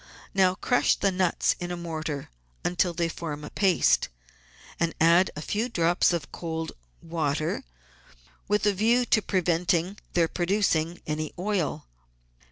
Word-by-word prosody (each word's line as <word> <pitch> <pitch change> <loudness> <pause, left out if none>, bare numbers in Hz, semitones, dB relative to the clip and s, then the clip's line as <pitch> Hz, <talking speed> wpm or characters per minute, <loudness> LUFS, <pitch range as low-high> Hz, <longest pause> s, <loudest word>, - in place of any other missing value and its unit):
Now 185 -1 +3
crush 245 +5 +2
the 195 - +1
nuts 180 -2 +1
in 175 - -4
a 175 - -3
mortar 160 - -5 0.3
until 180 0 +1
they 170 0 -1
form 155 -3 -5
a - - -8
paste, 190 -3 +3 0.7
and 165 -1 0
add 170 +3 +5
a 150 - -6
few 220 +8 -1
drops 175 -5 +2
of 170 -5 -3
cold 160 -1 -4 0.3
water 155 -2 -1 0.8
with 210 0 +1
a 205 - +4
view 230 +5 +3
to 215 - +3
preventing 180 0 0
their 170 -2 +3
producing 175 -2 0
any 155 0 -3
oil. 185 - -1
175 Hz, 140 wpm, -27 LUFS, 160-190 Hz, 0.8 s, add